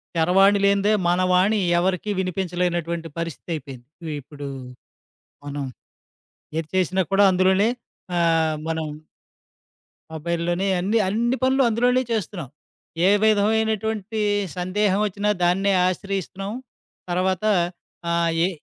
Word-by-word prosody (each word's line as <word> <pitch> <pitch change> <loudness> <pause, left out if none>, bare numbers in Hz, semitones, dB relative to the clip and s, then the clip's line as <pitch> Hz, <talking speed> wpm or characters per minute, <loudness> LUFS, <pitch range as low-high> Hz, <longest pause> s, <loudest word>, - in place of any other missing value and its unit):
చరవాణి 195 +5 +4
లేనిదే 200 +1 +3 0.2
మన 175 +1 +2
వాణి 190 +4 +3 0.2
ఎవరికీ 185 +3 -1
వినిపించలేనటువంటి 175 -2 -2
పరిస్థితయిపోయింది. 150 -6 -6 0.2
వి 155 - -3
ఇప్పుడూ 145 +1 -9 1.0
మనం 145 0 -4 0.9
ఏది 160 -1 -2
చేసినా 185 +1 +2
కూడా 200 - +5
అందులోనే. 190 +3 +3 0.5
ఆహ్, 165 -2 +2
మనం 160 -1 -2 1.3
మొబైల్‌లోనే 170 +3 -1
అన్ని, 200 +6 +1
అన్ని 235 +6 +1
పనులు 265 +1 +3
అందులోనే 245 +3 +2
చేస్తున్నాం. 185 - -3 0.6
ఏ - - +6
విధమైనటువంటీ 220 0 +1 0.4
సందేహవొచ్చినా 200 +2 0
దాన్నే 195 +3 +2
ఆశ్రయిస్తున్నాం. 195 +1 -3 0.6
తరువాతా 185 +4 +1 0.6
ఆహ్, 170 -1 +2
ఏ - - +2
185 Hz, 95 wpm, -23 LUFS, 170-205 Hz, 1.3 s, ఏ